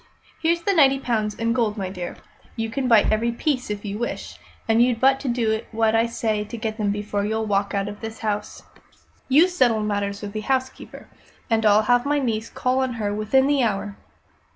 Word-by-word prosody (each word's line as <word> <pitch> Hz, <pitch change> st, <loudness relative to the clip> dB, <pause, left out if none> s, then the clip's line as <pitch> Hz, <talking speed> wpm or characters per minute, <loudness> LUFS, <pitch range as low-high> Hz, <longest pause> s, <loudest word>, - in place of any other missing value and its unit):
Here's 335 Hz, +1 st, +1 dB
the 400 Hz, -, +2 dB
ninety 275 Hz, -6 st, +5 dB
pounds 220 Hz, -5 st, -1 dB
in 230 Hz, 0 st, 0 dB
gold, 225 Hz, -3 st, 0 dB
my 190 Hz, -2 st, -3 dB
dear. 180 Hz, -2 st, -6 dB, 0.4 s
You 225 Hz, 0 st, -3 dB
can 260 Hz, +1 st, -2 dB
bite 225 Hz, -4 st, +5 dB
every 225 Hz, +2 st, +1 dB
piece, 255 Hz, 0 st, -2 dB
if 210 Hz, 0 st, -4 dB
you 205 Hz, +1 st, -4 dB
wish; 240 Hz, -, -5 dB, 0.3 s
and 225 Hz, +1 st, +4 dB
you've 240 Hz, -2 st, +2 dB
but 270 Hz, +1 st, +4 dB
to 280 Hz, -, -6 dB
do 225 Hz, -3 st, 0 dB
what 225 Hz, 0 st, +1 dB
I 225 Hz, +1 st, +3 dB
say 220 Hz, -2 st, -1 dB
to 210 Hz, +3 st, -8 dB
get 220 Hz, 0 st, -4 dB
them 205 Hz, -1 st, 0 dB
before 205 Hz, 0 st, -2 dB
you 220 Hz, +2 st, -1 dB
walk 200 Hz, -2 st, 0 dB
out 200 Hz, 0 st, -1 dB
of 205 Hz, 0 st, -8 dB
this 225 Hz, 0 st, -6 dB
house. 210 Hz, -1 st, -3 dB, 0.7 s
You 300 Hz, +7 st, +6 dB
settle 250 Hz, -11 st, +2 dB
matters 205 Hz, -1 st, -2 dB
with 200 Hz, 0 st, -6 dB
the 215 Hz, -, -3 dB
housekeeper, 260 Hz, +2 st, -3 dB, 0.4 s
and 225 Hz, -1 st, +3 dB
I'll 210 Hz, +1 st, +5 dB
have 245 Hz, +4 st, +2 dB
my 290 Hz, +1 st, +2 dB
niece 230 Hz, -5 st, -2 dB
call 255 Hz, 0 st, 0 dB
on 260 Hz, -1 st, 0 dB
her 210 Hz, -3 st, -2 dB
within 215 Hz, +6 st, +2 dB
the 285 Hz, -1 st, +2 dB
hour." 205 Hz, -3 st, -1 dB
225 Hz, 210 wpm, -23 LUFS, 210-255 Hz, 0.7 s, You